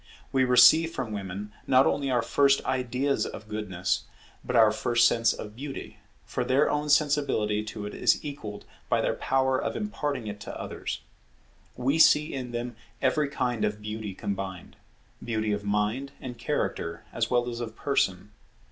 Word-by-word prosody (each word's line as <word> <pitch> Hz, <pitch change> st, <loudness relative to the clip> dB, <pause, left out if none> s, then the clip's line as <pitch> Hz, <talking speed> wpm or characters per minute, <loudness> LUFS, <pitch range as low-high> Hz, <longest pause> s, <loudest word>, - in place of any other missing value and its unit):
We 130 Hz, -1 st, +3 dB
receive 155 Hz, +6 st, +7 dB
from 120 Hz, -8 st, -4 dB
women, 100 Hz, +1 st, -5 dB
not 130 Hz, 0 st, +5 dB
only 140 Hz, -1 st, +1 dB
our 120 Hz, -3 st, +2 dB
first 140 Hz, +3 st, +3 dB
ideas 130 Hz, +2 st, 0 dB
of 110 Hz, -, -9 dB
Goodness, 95 Hz, -4 st, -2 dB, 0.4 s
but -, -, -3 dB
our 110 Hz, -2 st, +7 dB
first 120 Hz, +2 st, +3 dB
sense 115 Hz, -1 st, +3 dB
of 105 Hz, 0 st, -7 dB
Beauty; 135 Hz, +2 st, -7 dB, 0.3 s
for -, -, -2 dB
their 135 Hz, +3 st, +3 dB
own 150 Hz, 0 st, -1 dB
sensibility 140 Hz, -8 st, +2 dB
to 105 Hz, -1 st, -6 dB
it 105 Hz, -, -6 dB
is 115 Hz, -, +2 dB
equalled 110 Hz, -8 st, -7 dB, 0.2 s
by -, -, +3 dB
their -, -, +1 dB
power 130 Hz, 0 st, +1 dB
of -, -, -3 dB
imparting 145 Hz, -, -3 dB
it 105 Hz, -1 st, -6 dB
to -, -, -7 dB
others. -, -, -5 dB, 0.8 s
We 135 Hz, +5 st, +1 dB
see 150 Hz, 0 st, +5 dB
in 130 Hz, -2 st, -4 dB
them 120 Hz, 0 st, -4 dB, 0.2 s
every 140 Hz, +3 st, +1 dB
kind 125 Hz, -5 st, -1 dB
of 105 Hz, 0 st, -1 dB
beauty 105 Hz, -2 st, -5 dB
combined; 95 Hz, -2 st, -5 dB, 0.5 s
beauty 110 Hz, -2 st, -1 dB
of 105 Hz, 0 st, -2 dB
mind 105 Hz, +7 st, -1 dB
and 125 Hz, -2 st, -7 dB
character 85 Hz, -7 st, -2 dB
as 115 Hz, -1 st, 0 dB
well 120 Hz, -1 st, +2 dB
as 120 Hz, -1 st, -4 dB
of 115 Hz, -2 st, -5 dB
person. 100 Hz, -9 st, 0 dB
120 Hz, 165 wpm, -27 LUFS, 105-135 Hz, 0.8 s, receive